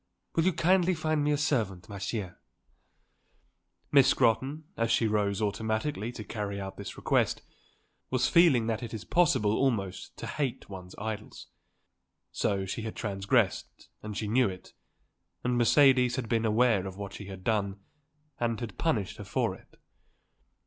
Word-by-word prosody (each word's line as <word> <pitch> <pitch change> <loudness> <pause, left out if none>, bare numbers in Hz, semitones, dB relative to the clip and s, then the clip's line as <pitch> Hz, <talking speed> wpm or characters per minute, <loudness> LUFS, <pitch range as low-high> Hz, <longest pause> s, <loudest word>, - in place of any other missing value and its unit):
Will 165 - +2
you 185 - +3
kindly 180 +2 +3
find 155 -1 0
me 150 - +2
a 145 - +2
servant, 115 -11 -1
ma 100 -3 -7
chère." 100 -1 -4 1.5
Miss 140 -2 +6
Scrotton, 135 +5 +2
as 115 0 0
she 115 - +3
rose 105 -1 +1
automatically 110 +3 -1
to 110 - -7
carry 100 -1 -4
out 95 0 -6
this - - -8
request, - - +1 0.7
was 130 -1 +2
feeling 165 -10 +5
that 115 -1 -1
it 115 -2 -5
is 110 - -6
possible 130 -12 +3
almost 110 -9 -1
to - - -6
hate 140 -5 -3
one's 95 -2 -9
idols. 110 0 -6 0.8
She 95 +2 -1
had 110 0 -5
transgressed, 100 +1 -1
and 105 -1 -6
she 110 - -2
knew 120 +1 +3
it, 90 -1 -10 0.7
and 125 0 +1
Mercedes 125 0 +5
had 130 -3 -3
been 115 0 +1
aware 110 -3 +3
of 95 0 -8
what 100 -1 -6
she 100 - -8
had 95 -1 -9
done 100 -2 0 0.6
and 115 -2 0
had 120 -3 -7
punished 110 - 0
her - - -7
for - - -1
it. - - -17
110 Hz, 155 wpm, -29 LUFS, 100-130 Hz, 1.5 s, Miss